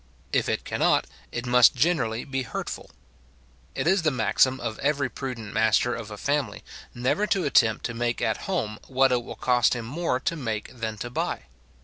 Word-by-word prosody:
If - - +2
it - - -1
cannot, - - +2 0.3
it 120 +1 -4
must 125 0 +6
generally 125 -6 +1
be 135 -1 -2
hurtful. 125 - -5 0.9
It - - -1
is 190 +3 +3
the 160 - +3
maxim 130 +1 +2
of 115 -3 -4
every 140 -1 +1
prudent 115 -5 -6
master 110 +2 +3
of 115 -3 -6
a 105 - -8
family, 145 +5 -1 0.3
never 130 +13 +1
to 195 -3 +1
attempt 115 -6 +3
to 115 - -3
make 120 0 -1
at 110 - 0
home 110 - -2
what 135 0 +3
it 125 -1 +1
will - - -8
cost 125 0 +2
him 120 -2 -5
more 140 +1 -1
to 165 +6 -1
make 115 -6 -4
than 110 -2 -4
to 120 +4 -6
buy. - - -2
125 Hz, 190 wpm, -26 LUFS, 115-140 Hz, 0.9 s, must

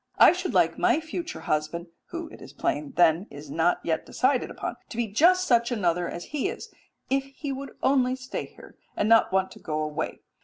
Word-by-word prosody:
I - - +9
should 365 +1 -3
like - - +3
my - - +3
future 330 +2 -5
husband 155 +3 -1 0.2
[who, 340 -1 -6
it - - -13
is - - -11
plain, 300 -5 -2
then, 175 +1 +4
is 145 0 -10
not 165 +3 +2
yet 160 -1 0
decided 260 0 +1
upon] - - -5
to 230 - -8
be 240 - +1
just 350 - +4
such 235 -4 +3
another 180 -6 0
as 175 - -6
he 300 +5 0
is, 465 - -8 0.4
if 270 0 +2
he 275 +1 -6
would 275 +1 -7
only 260 -1 +3
stay 255 0 -5
here, - - -16 0.2
and 210 - +1
not 225 0 +5
want 190 0 +1
to - - -12
go 155 -2 -3
away. 150 -1 -4
245 Hz, 205 wpm, -26 LUFS, 175-290 Hz, 0.4 s, I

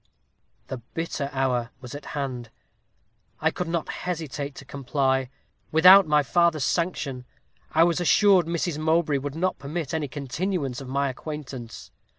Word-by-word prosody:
"The 130 - -5 0.2
bitter 165 -4 -2
hour 130 -3 0
was 125 -2 -9
at 145 - -8
hand. 125 -4 -4 0.9
I - - +2
could 180 - -4
not 165 -1 -2
hesitate 150 -5 -4
to 140 - -10
comply. 135 -1 0 0.4
Without 180 +4 +8
my 150 -1 +4
father's 170 0 +2
sanction, 150 -7 -1 0.5
I 160 - +6
was 170 +1 +2
assured 185 -1 +5
Mrs. 170 -2 -1
Mowbray 155 -2 +2
would 140 +1 -5
not 185 +3 -1
permit 150 +2 -4
any 155 -2 -1
continuance 140 0 -3
of 135 - -8
my 140 +2 0
acquaintance. 135 -3 -7
150 Hz, 145 wpm, -25 LUFS, 135-170 Hz, 0.9 s, Without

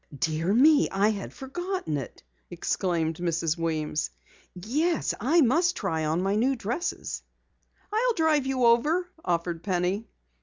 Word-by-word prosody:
"Dear 165 +2 0
me, 290 +7 +5
I 200 +2 +2
had 205 -3 -4
forgotten 350 - -4
it!" 135 - -8 0.3
exclaimed 165 -3 -1
Mrs. 170 -2 0
Weems. 155 -2 -2 0.5
"Yes, 295 - 0
I 310 +10 +3
must 335 +7 +3
try 160 -6 -1
on 160 +4 0
my 195 +1 +1
new 255 +5 +2
dresses!" 240 - -3 0.7
"I'll 480 +3 +2
drive 310 -4 +2
you 260 -2 +1
over," 300 +10 +3 0.2
offered 170 -1 -1
Penny. 185 +4 -1
210 Hz, 130 wpm, -27 LUFS, -, 0.7 s, me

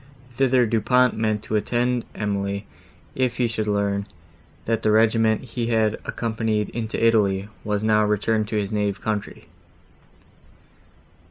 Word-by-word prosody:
Thither 125 0 +3
Du 115 0 0
Pont 125 +3 +3
meant 110 -1 -1
to 110 - -3
attend 120 +2 0
Emily, 100 -1 -2 0.5
if 125 -2 -1
he 125 - +2
should 110 -1 -3
learn, 100 -1 0 0.6
that 115 0 0
the - - +1
regiment 110 0 +3
he 120 -1 -4
had 110 -2 +2
accompanied 110 -2 -2
into 115 -2 -4
Italy, 105 -3 +2
was 105 0 -1
returned 105 0 +2
to 110 - -4
his 100 -1 -3
native 105 -2 -1
country. 105 -2 -4
110 Hz, 135 wpm, -23 LUFS, 105-115 Hz, 0.6 s, Thither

